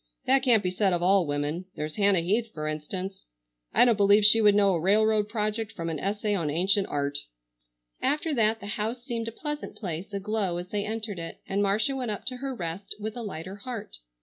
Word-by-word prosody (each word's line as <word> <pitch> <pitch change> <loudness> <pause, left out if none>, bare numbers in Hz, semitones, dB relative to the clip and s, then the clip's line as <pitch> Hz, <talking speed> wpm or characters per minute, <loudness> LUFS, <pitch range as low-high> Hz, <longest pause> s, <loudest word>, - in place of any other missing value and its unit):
That 270 0 +4
can't 240 -5 +4
be 180 - 0
said 190 0 +2
of 175 0 0
all 190 -2 +4
women. 145 +5 -2
There's 155 0 -4
Hannah 200 -4 +4
Heath, 220 +6 0
for 155 -1 -4
instance. 185 +6 -5 0.4
I - - +6
don't 235 -3 +3
believe 205 +1 +5
she 225 +2 +7
would 205 -1 +6
know 200 -2 +4
a 170 - +1
railroad 210 +3 +3
project 215 0 -2
from 165 -1 -4
an 155 - -3
essay 205 +3 -1
on 170 -7 0
ancient 190 +6 +2
art." 145 0 -1 0.8
After 300 +2 +1
that 225 -3 +2
the - - -7
house 220 +4 -3
seemed 235 -3 -3
a - - -3
pleasant 295 +4 -5
place 180 -1 -5
aglow 200 -2 -1
as 175 +1 -6
they 205 0 -2
entered 215 -3 -3
it, 165 - -7
and 195 +1 0
Marcia 210 +7 +1
went 255 -3 -3
up 210 +1 -4
to 255 0 -3
her 270 0 -4
rest 180 0 -5
with 215 +1 -4
a 240 - -5
lighter 190 -2 -6
heart. 220 -1 -7
205 Hz, 215 wpm, -27 LUFS, 180-225 Hz, 0.8 s, she